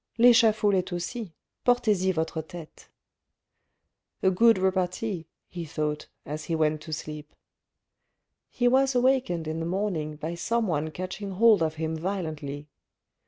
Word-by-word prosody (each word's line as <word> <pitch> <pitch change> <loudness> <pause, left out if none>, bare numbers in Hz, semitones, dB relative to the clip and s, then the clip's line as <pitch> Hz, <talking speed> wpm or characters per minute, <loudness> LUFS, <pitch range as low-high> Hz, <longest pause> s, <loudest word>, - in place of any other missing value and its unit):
L'echafaud 225 -3 +5
Test 185 -1 0
aussi: 185 +3 -4 0.3
portez 235 -6 +2
y - - +4
votre 160 -1 -2
tete. 160 0 -12 0.7
" - - -48
A 190 - +5
good 225 +4 +5
repartee 185 -1 -1
" - - -58
he 175 - -3
thought, 150 -1 -3 0.2
as 150 +1 -5
he 165 - -1
went 155 -1 +1
to 160 +1 -9
sleep. 150 0 -6 1.1
He 245 - +1
was 265 +1 +3
awakened 245 -10 +2
in 160 +1 -3
the 165 - -3
morning 175 -5 -2
by 160 +3 -4
someone 170 -5 -1
catching 185 +4 -5
hold 215 -1 +5
of 160 -1 0
him 160 0 -2
violently. 155 -5 -4
175 Hz, 145 wpm, -27 LUFS, 155-215 Hz, 1.1 s, L'echafaud